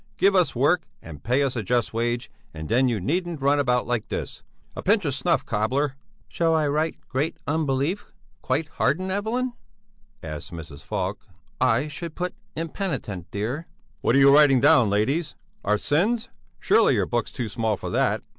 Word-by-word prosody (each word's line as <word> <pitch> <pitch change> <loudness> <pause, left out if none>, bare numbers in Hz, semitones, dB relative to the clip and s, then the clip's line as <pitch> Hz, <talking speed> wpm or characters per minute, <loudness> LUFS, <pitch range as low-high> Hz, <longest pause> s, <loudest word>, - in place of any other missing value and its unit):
Give 195 0 +4
us 180 -7 +3
work 150 +8 +3 0.2
and 80 -3 -10
pay 130 +4 +2
us 135 -2 -1
a 115 - -1
just 120 +4 0
wage 120 +1 -1 0.2
and 80 0 -6
then 130 +3 +3
you 115 -4 0
needn't 170 - -1
run 140 +1 +3
about 125 -3 +2
like 120 -3 -2
this. - - -5 0.3
A - - -5
pinch 205 -1 +2
of 145 - 0
snuff, 170 +5 +1
cobbler!" 130 +6 0 0.3
"Shall 165 -1 +1
I 155 -2 +2
write: 155 +2 0
Great 145 +5 -1
unbelief, 150 +5 -1 0.3
quite 155 0 -1
hardened, 185 +4 +1
Evelyn?" 235 +6 -1 0.7
asked 75 0 -7
Mrs. 80 -4 -9
Falk. - - -4 0.3
"I 130 +2 +3
should 155 +2 -7
put 180 0 -3 0.2
impenitent, 160 - -4
dear." 120 +11 -3 0.3
"What 120 - +2
are - - +6
you 140 0 +7
writing 145 -3 +6
down, 120 -2 +5
ladies? 135 +11 0 0.3
Our 105 +1 +2
sins? 200 - +1 0.3
Surely - - +4
your - - +1
book's 120 -1 -2
too 125 -4 -4
small 110 -1 -1
for - - -6
that!" - - +1
140 Hz, 175 wpm, -25 LUFS, 115-165 Hz, 0.7 s, you